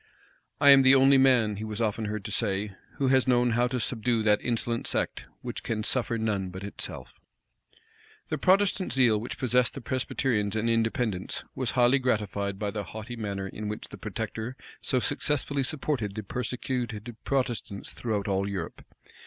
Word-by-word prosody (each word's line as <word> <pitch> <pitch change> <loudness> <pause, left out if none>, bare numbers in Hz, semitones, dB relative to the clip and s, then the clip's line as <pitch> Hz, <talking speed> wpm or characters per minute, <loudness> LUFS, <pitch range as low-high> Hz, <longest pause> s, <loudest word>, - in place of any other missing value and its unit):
"I 140 -1 +8
am 135 -1 +9
the 130 0 +7
only 135 0 +6
man," 120 -6 +4
he 105 - -5
was 110 0 -4
often 110 -1 0
heard 105 -1 -4
to - - -4
say, 100 -2 0 0.2
"who 135 -2 +1
has 130 -1 +4
known 120 -1 +3
how 120 +2 +2
to 125 0 -2
subdue 115 0 0
that 105 -1 +3
insolent 115 -1 -1
sect, - - -2 0.2
which - - -4
can 110 -1 -2
suffer 120 0 0
none 105 -4 -1
but 95 +2 -8
itself." 100 - -6 1.2
The - - -2
Protestant 190 0 +3
zeal 120 -5 +4
which 120 - -5
possessed 125 -1 +2
the - - -4
Presbyterians 120 -4 -1
and 110 +1 0
Independents, 115 -4 0
was 130 -2 -1
highly 125 +3 +5
gratified 100 -5 -1
by 105 0 -2
the 105 -1 -3
haughty 110 +2 -7
manner 100 -4 -4
in 105 +2 -6
which 105 +1 -5
the - - -9
protector 120 +4 -5 0.2
so 130 - +2
successfully 145 +1 0
supported 130 -7 -2
the 110 - -4
persecuted 120 0 -3
Protestants 120 -7 -2
throughout 105 -4 -2
all 100 0 0
Europe. 95 -5 -5
115 Hz, 170 wpm, -28 LUFS, 105-130 Hz, 1.2 s, am